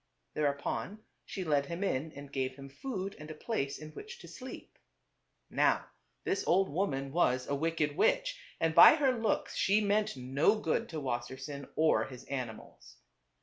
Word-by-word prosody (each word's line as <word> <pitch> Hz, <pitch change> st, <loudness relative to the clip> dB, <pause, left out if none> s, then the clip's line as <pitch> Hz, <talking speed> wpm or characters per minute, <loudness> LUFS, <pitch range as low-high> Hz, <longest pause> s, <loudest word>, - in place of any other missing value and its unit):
Thereupon 150 Hz, +8 st, -2 dB, 0.2 s
she 190 Hz, -, -4 dB
led 145 Hz, -4 st, +1 dB
him 170 Hz, +5 st, -4 dB
in 155 Hz, -4 st, -1 dB
and 140 Hz, 0 st, -10 dB
gave 130 Hz, -1 st, -1 dB
him 135 Hz, 0 st, -10 dB
food 195 Hz, -, -5 dB
and 150 Hz, +1 st, -9 dB
a 155 Hz, -, -6 dB
place 150 Hz, -6 st, -2 dB
in 155 Hz, 0 st, -9 dB
which 450 Hz, -, -9 dB
to -, -, -11 dB
sleep. -, -, -10 dB, 0.7 s
Now -, -, +1 dB, 0.3 s
this 195 Hz, -, 0 dB
old 190 Hz, +2 st, +4 dB
woman 140 Hz, -5 st, -1 dB
was 130 Hz, -6 st, +2 dB
a -, -, -1 dB
wicked 150 Hz, 0 st, 0 dB
witch -, -, +2 dB, 0.2 s
and 165 Hz, -1 st, +1 dB
by 170 Hz, -, +10 dB
her 280 Hz, -4 st, +3 dB
looks 225 Hz, -4 st, -1 dB
she 200 Hz, +2 st, +3 dB
meant 210 Hz, -4 st, +1 dB
no 135 Hz, +11 st, +2 dB
good 165 Hz, -7 st, -1 dB
to 160 Hz, -, -4 dB
Wassersein 130 Hz, +2 st, -4 dB
or 160 Hz, 0 st, +3 dB
his 125 Hz, -2 st, -10 dB
animals. 125 Hz, -5 st, -7 dB
155 Hz, 165 wpm, -32 LUFS, 135-200 Hz, 0.7 s, by